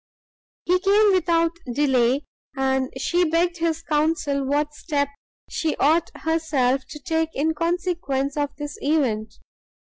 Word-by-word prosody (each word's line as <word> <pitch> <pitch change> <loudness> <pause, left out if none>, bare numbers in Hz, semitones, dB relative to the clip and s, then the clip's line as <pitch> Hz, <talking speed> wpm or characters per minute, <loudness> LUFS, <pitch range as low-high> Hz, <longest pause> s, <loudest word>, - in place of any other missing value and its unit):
He 365 +1 +3
came 405 +2 +4
without 335 -2 +2 0.2
delay, 265 0 +2 0.3
and 265 -1 0
she 355 +1 +1
begged 345 +1 +1
his 330 -1 -1
counsel 295 -2 0
what 295 +2 0
step 285 -2 -1 0.4
she 320 -2 -1
ought 320 +4 +3
herself 295 -5 +1
to 300 - -8
take 320 +2 -1
in 315 +3 +1
consequence 335 -5 -1
of 290 -1 0
this 295 -1 -7
event. 230 -8 0
305 Hz, 125 wpm, -23 LUFS, 275-335 Hz, 0.4 s, came